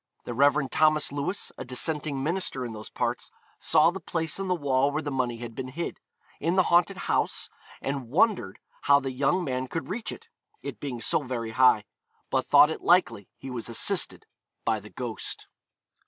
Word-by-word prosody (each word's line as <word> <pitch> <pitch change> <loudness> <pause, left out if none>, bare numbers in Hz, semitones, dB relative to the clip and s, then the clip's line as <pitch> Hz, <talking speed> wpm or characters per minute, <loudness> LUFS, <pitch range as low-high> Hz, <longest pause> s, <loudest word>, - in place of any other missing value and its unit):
The 120 - -5
Rev. 140 +2 +3
Thomas 155 -2 +3
Lewis, 145 +8 -3
a - - -4
dissenting 140 +2 0
minister 160 -5 -1
in 115 - -6
those 110 0 -9
parts, - - -3 0.3
saw 170 - +4
the 195 - -6
place 165 -1 -3
in 195 - -3
the 180 - +1
wall 140 -3 +1
where 150 +2 -2
the 145 - -3
money 125 -3 -1
had 120 0 -7
been 130 +2 -5
hid, 160 +7 -5 0.4
in 170 +4 0
the 185 - +5
haunted 175 +2 +4
house, - - -1 0.3
and 135 -3 -3
wondered 200 - +2 0.2
how 140 0 +5
the 135 -1 -4
young 145 +8 +1
man 130 -3 -2
could 165 +5 -5
reach 220 +5 -3
it, - - -11 0.4
it - - -6
being 125 -5 -5
so - - +2
very 120 -4 -4
high; 125 -3 +4 0.5
but - - 0
thought 150 - +7
it - - -5
likely 115 - +2
he 135 - -8
was 120 -2 -4
assisted 115 - +3 0.4
by 110 -1 +1
the 105 +1 -13
ghost. 120 -2 -6
140 Hz, 185 wpm, -27 LUFS, 125-160 Hz, 0.5 s, thought